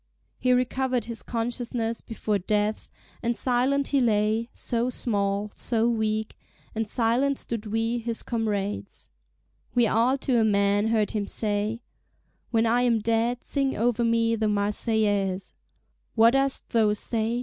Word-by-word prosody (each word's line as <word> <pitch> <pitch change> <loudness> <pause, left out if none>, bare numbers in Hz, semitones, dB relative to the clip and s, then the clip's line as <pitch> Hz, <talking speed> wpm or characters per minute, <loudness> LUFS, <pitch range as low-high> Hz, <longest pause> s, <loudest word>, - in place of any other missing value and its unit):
He 255 - +2
recovered 250 -1 +1
his 230 -1 -5
consciousness 230 -1 -2
before 215 -2 -2
death, 210 +3 -1 0.3
and 235 0 -1
silent 265 +3 +1
he 280 -2 +2
lay, 220 0 +1
so 240 +1 -1
small, 205 -4 -1
so 230 -1 0
weak; 220 -2 -1 0.4
and 225 -1 -2
silent 250 +5 +1
stood 230 -2 -5
we 225 +2 0
his 230 0 -4
comrades'. 210 -4 -3 0.6
We 240 -1 +5
all 235 +5 +2
to 260 -3 +1
a - - +4
man 205 0 +2
heard 220 -2 +1
him 205 -2 -2
say: 215 +2 -1 0.7
"When 225 -1 +2
I 235 +2 +3
am 240 -2 +3
dead 230 +2 0
sing 275 -2 -1
over 235 +1 +1
me 230 0 +2
the 220 -1 0
Marseillaise." 205 -2 0 0.6
"What 230 0 +6
dost 270 +1 0
thou 220 -2 +3
say?" 225 +2 -1
225 Hz, 140 wpm, -26 LUFS, 210-240 Hz, 0.7 s, What